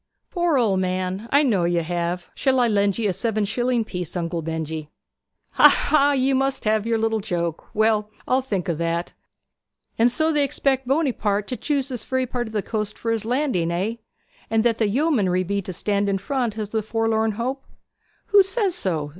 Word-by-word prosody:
'Poor 345 -5 +1
old 210 -6 +2
man 185 +3 -2
I 285 +2 +5
know 210 -10 +2
you 170 -1 +1
have. 175 +1 -3
Shall 265 -2 +1
I 245 - +4
lend 200 -3 +1
you 225 -2 0
a 190 - 0
seven 215 +1 -1
shilling 240 +2 0
piece, 180 -3 -5
Uncle 170 -1 -2
Benjy?' 160 -1 -4 0.6
'Ha, - - +7
ha! 290 -1 +3
you 270 0 +2
must 270 -1 0
have 215 0 +1
your 225 -1 +1
joke; 170 -5 -3
well, 215 -1 +2 0.2
I'll 260 +1 +2
think 205 -9 -3
o' 170 - +1
that. 170 +2 -2 0.9
And 235 +2 +5
so 315 +5 +1
they 295 -1 +3
expect 270 -1 0
Buonaparty 240 -8 0
to 255 - -2
choose 280 +3 -1
this 250 -3 -4
very 260 0 -1
part 245 -1 -3
of 220 - -10
the 210 -2 -1
coast 215 -2 -3
for 230 - -2
his 225 -2 -1
landing, 245 - 0
hey? 205 +7 -2 0.5
And 220 0 +2
that 230 -1 +1
the 220 - +3
yeomanry 205 - +1
be 200 +2 -1
to 185 - -6
stand 200 +3 0
in 195 - +1
front 235 +1 -2
as 210 -2 -4
the 220 - 0
forlorn 225 0 0
hope?' 255 +5 -3 0.7
'Who 410 -2 +7
says 385 0 0
so?' 160 - -2
220 Hz, 195 wpm, -23 LUFS, 185-255 Hz, 0.9 s, Ha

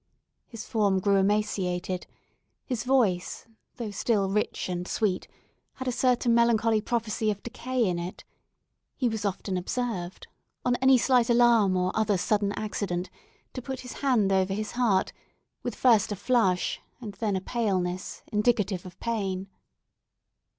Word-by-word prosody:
His 230 -2 -8
form 200 -4 +1
grew 200 +1 +3
emaciated; 190 -3 0 0.6
his 245 -5 -2
voice, 230 -9 +1 0.3
though 230 -4 -5
still 200 -1 +1
rich 210 +1 -1
and 180 0 -3
sweet, 200 -5 -1 0.5
had 260 - -6
a - - +2
certain 245 -1 +2
melancholy 230 -2 +3
prophecy 220 -1 -1
of 205 -1 -3
decay 250 0 -1
in 175 -2 -1
it; 175 +2 -6 0.7
he 255 - 0
was 220 -2 -2
often 190 -1 -2
observed, 185 -2 -3 0.4
on 245 0 +3
any 260 +1 +5
slight 245 -1 +3
alarm 235 -5 +4
or 180 0 +1
other 215 -2 +1
sudden 205 +2 +1
accident, 195 -4 -3 0.4
to 255 - -5
put 265 +1 -5
his 250 - -8
hand 240 -8 +3
over 190 0 +2
his 215 0 -3
heart 230 -6 +1 0.5
with - - -4
first 225 -5 +4
a - - -1
flush 205 -4 +1 0.2
and 220 -5 -7
then 210 -3 0
a - - 0
paleness, 185 -5 -2
indicative 210 -4 +1
of 180 +1 -14
pain. 195 -4 -2
210 Hz, 145 wpm, -27 LUFS, 190-235 Hz, 0.7 s, any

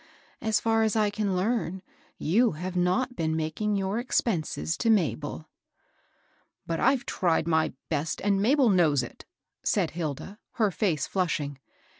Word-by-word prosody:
So 220 - -1
far 225 +1 +3
as 220 -1 +1
I 210 -2 +2
can 205 -2 -1
learn, 190 -2 -1 0.3
yon 220 +6 +2
have 180 +4 -5
not 210 +9 +1
been 160 -4 -1
making 160 +7 -1
your 195 +3 -1
expenses 190 - -1
to 230 - 0
Ma 200 -9 +4
bel." 155 +1 -7 0.6
" - - -40
But 165 -1 -2
IVe 265 -2 +2
tried 165 -3 +1
my 160 -1 +2
best, 155 0 -2
and 200 0 +1
Mabel 260 +3 +4
knows 155 -8 +3
it,'* 120 - -10 0.4
said - - +1
Hilda, 170 +5 -5
her 215 -4 +2
face 165 -7 0
flushing. 150 -7 -2
185 Hz, 155 wpm, -27 LUFS, 160-220 Hz, 0.6 s, Ma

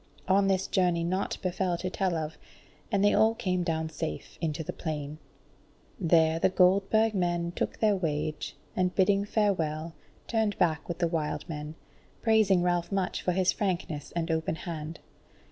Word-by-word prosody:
On 195 +1 +4
this 190 -1 +2
journey 175 -3 +1
naught 185 +3 -1
befell 185 -1 0
to 185 +1 -4
tell 190 -3 0
of, 160 -1 -3 0.6
and 200 -1 +3
they 205 - +5
all 220 +1 +4
came 185 -4 -1
down 160 -2 -1
safe 160 0 -6
into 160 -1 -2
the - - -5
plain. 150 -1 -5 0.8
There 165 -2 +3
the - - +4
Goldburg 195 +4 +3
men 175 -2 0
took - - -3
their 215 -2 +3
wage, 155 -4 -2 0.2
and 180 -1 +1
bidding 200 +1 +3
farewell, 165 -7 0 0.3
turned 220 -3 0
back 160 -4 +1
with 170 - -3
the 175 - +1
wild 160 -3 -2
men, 150 -1 -6 0.5
praising 215 -5 +4
Ralph 175 0 0
much 195 -2 -1
for 180 - 0
his 185 0 +3
frankness 170 -7 -3
and 165 -1 -1
open 160 0 0
hand. 160 -1 -6
175 Hz, 160 wpm, -29 LUFS, 160-195 Hz, 0.8 s, they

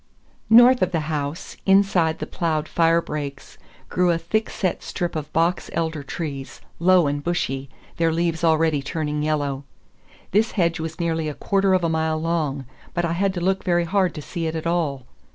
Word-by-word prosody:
North 245 +2 +7
of 185 - +2
the 165 -3 0
house, 150 0 -4
inside 195 -5 +3
the - - -4
ploughed 160 -3 -1
fire 165 0 +3
breaks, 140 -2 -6 0.3
grew 180 0 +1
a 170 - +3
thick 195 +7 -1
set 185 -3 -2
strip 175 -1 -3
of 155 -1 -4
box 170 +3 +1
elder 160 -2 -1
trees, 140 -2 -6 0.2
low 180 0 +5
and 145 0 -1
bushy, 140 -6 -2 0.3
their 165 -1 +2
leaves 165 0 -1
already 160 -2 +3
turning 150 +1 -3
yellow. 145 -3 -1 0.7
This 215 +4 +2
hedge 170 -4 +1
was 160 +2 -5
nearly 165 -2 -1
a 145 - -6
quarter 195 -1 +2
of 185 - 0
a - - +2
mile 160 0 0
long, 155 -5 -1 0.3
but 175 - +1
I 165 - -1
had 195 +3 +1
to 175 - -3
look 190 +2 0
very 175 -2 +2
hard 190 +1 +1
to 150 - -6
see 165 +3 -4
it 160 - -3
at 160 - -4
all. 155 -6 -1
165 Hz, 190 wpm, -23 LUFS, 155-175 Hz, 0.7 s, North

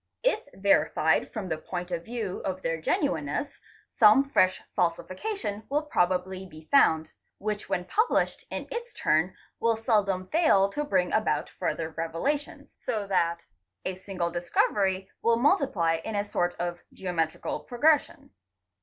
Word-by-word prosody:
If - - +3 0.2
verified 200 +1 +2
from 210 -5 -5
the 160 -2 -2
point 180 +1 -5
of 170 -1 -2
view 225 -4 -4
of 185 -1 -4
their 165 -1 -1
genuineness 160 - -1 0.4
some 215 +5 +8
fresh 185 -9 +2
falsification 200 - -2
will 295 +3 +1
probably 185 -7 0
be 155 -2 -14
found, 160 - +4 0.2
which 210 0 -4
when 180 - -1
published 435 - +1
in - - -5
its 480 +1 -5
turn 160 +4 +1 0.2
will 230 -1 +2
seldom 200 -5 +1
fail 305 - +4
to 295 +9 -2
bring 185 -10 +1
about 215 - +1
further 160 -1 -2
revelations, 165 - -3
so 210 -2 -2
that 170 -3 0 0.4
a 185 - -1
single 185 -2 -3
discovery 190 +2 +1
will 230 0 +3
multiply 235 - +2
in 220 - -4
a 205 - +1
sort 175 -3 -1
of 175 0 -3
geometrical 165 -4 -2
progression. 290 +5 +1
190 Hz, 140 wpm, -28 LUFS, 175-230 Hz, 0.4 s, some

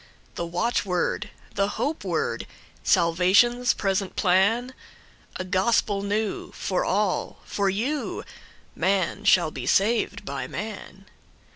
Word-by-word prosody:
The 170 - -4
watchword, 180 +2 -1 0.2
the 200 0 +1
hope 305 +3 -1
word, - - -2 0.4
Salvation's 190 +8 +4
present 195 -1 -1
plan?A 205 +2 -1
gospel 195 +2 +1
new, 205 +1 -2
for 185 - -1
all—for 200 0 -1
you:Man 200 - -3
shall 170 -4 +5
be 125 -3 -6
saved 205 - +2
by 135 -2 -4
man. 195 0 -7
195 Hz, 95 wpm, -25 LUFS, 185-220 Hz, 0.4 s, shall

